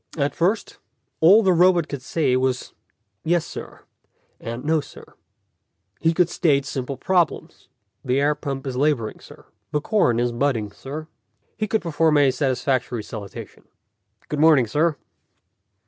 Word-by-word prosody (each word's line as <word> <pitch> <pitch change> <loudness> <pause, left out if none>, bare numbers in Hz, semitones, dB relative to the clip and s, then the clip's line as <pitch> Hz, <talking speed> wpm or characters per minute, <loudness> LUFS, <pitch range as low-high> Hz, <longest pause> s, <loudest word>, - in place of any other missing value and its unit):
At 145 -1 0
first, 195 +6 -1 0.4
all 195 +8 +7
the 190 -2 +4
robot 175 -1 +4
could 140 -4 -6
say 135 -1 0
was 130 0 -1 0.5
"Yes, 170 0 +1
sir," - - -9 0.6
and 115 +4 -6
"No, 160 0 +2
sir." - - -14 0.9
He 165 - +2
could 175 +1 +2
state 155 -6 +1
simple 135 0 -4
problems: 175 +2 -1 0.4
"The 130 +1 +1
air 145 +1 +2
pump 140 -2 -5
is 130 -2 -4
laboring, 130 -5 0
sir." - - -15 0.3
"The 150 - +1
corn 150 - +1
is 120 0 +1
budding, 120 -4 -1
sir." 150 +8 -8 0.5
He 215 -1 -2
could 220 +1 0
perform 160 -2 +2
a 140 -2 +4
satisfactory 130 -3 -1
salutation: 105 -3 -9 0.6
"Good 150 - -3
morning, 155 -5 +5
sir." 150 +7 +1
145 Hz, 145 wpm, -22 LUFS, 130-165 Hz, 0.9 s, all